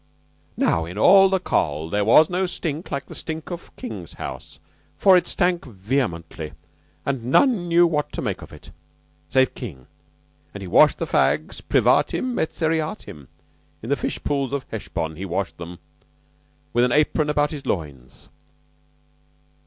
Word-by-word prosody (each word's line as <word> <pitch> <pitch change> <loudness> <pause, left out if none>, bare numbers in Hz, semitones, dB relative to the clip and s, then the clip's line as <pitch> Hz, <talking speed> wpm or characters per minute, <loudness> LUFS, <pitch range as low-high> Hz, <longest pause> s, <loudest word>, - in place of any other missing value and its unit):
"Now 80 0 +2
in 90 +4 -8
all 195 - +7
the 190 0 +1
Coll. 80 - -1
there 105 0 +1
was 135 +9 +6
no 185 +1 -1
stink 160 -2 -4
like 140 - -3
the - - -11
stink 160 +1 -6
of 175 0 -8
King's 90 -6 -7
house, 65 - -8 0.4
for 190 -1 +6
it 180 - +3
stank 175 -1 +1
vehemently 95 - -3 0.5
and 135 -4 -2
none 195 - +3
knew 170 +1 +5
what 150 -3 -1
to - - -3
make - - -3
of - - -11
it. - - -13 0.6
Save 130 0 +3
King. 75 - -8 0.7
And 100 - -6
he 95 - -6
washed - - +5
the - - -2
fags 80 - +1
privatim 255 -1 +2
et 160 - +1
seriatim. 160 - -3 0.6
In - - -6
the - - +4
fishpools 140 -2 -2
of 140 -2 -3
Hesbon 80 +3 -4
washed 95 +2 -2
he - - -5
them, 85 +1 -9 1.0
with 120 - +3
an 125 - +2
apron 150 +2 +2
about 145 0 +1
his 145 -4 -7
loins." 70 - -5
135 Hz, 155 wpm, -23 LUFS, -, 1.0 s, all